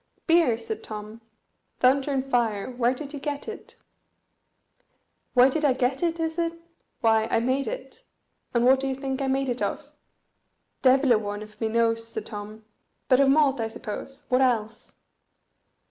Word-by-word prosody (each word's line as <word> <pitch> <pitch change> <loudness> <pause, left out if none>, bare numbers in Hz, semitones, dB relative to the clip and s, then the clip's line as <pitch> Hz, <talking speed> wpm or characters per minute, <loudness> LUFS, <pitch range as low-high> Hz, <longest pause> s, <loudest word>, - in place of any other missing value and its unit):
"Beer!" 330 -9 +4
said 330 - -6
Tom. 215 +1 -8 0.6
"Thunder 265 +2 +3
and 270 -2 0
fire! 235 -4 0
where 245 0 +1
did 285 +2 -8
you 290 - -5
get 285 +4 -4
it?" 440 - -8 1.6
"Where 250 +1 +7
did 305 +3 -1
I 280 -3 +4
get 260 +1 0
it, 335 -1 0
is 325 +1 -2
it? 335 -1 0 0.5
Why, 220 -1 +3
I - - +2
made 260 +4 0
it. - - -7 0.5
And 240 0 +2
what 260 +1 +6
do 270 - -2
you 265 - -1
think 270 0 -4
I 270 - 0
made 270 0 0
it 245 -1 -2
of?" - - -2 0.9
"Devil 265 0 +4
a 225 - +5
one 205 0 -5
of 215 +1 -16
me 225 - +1
knows," 230 0 +1
said - - -6
Tom; 215 +1 -8 0.4
"but 255 - +5
of 275 -1 +5
malt, 275 -2 +3
I 225 - 0
suppose, 230 +4 -7
what 255 +1 +3
else?" 225 -4 0
255 Hz, 175 wpm, -26 LUFS, 225-275 Hz, 1.6 s, Where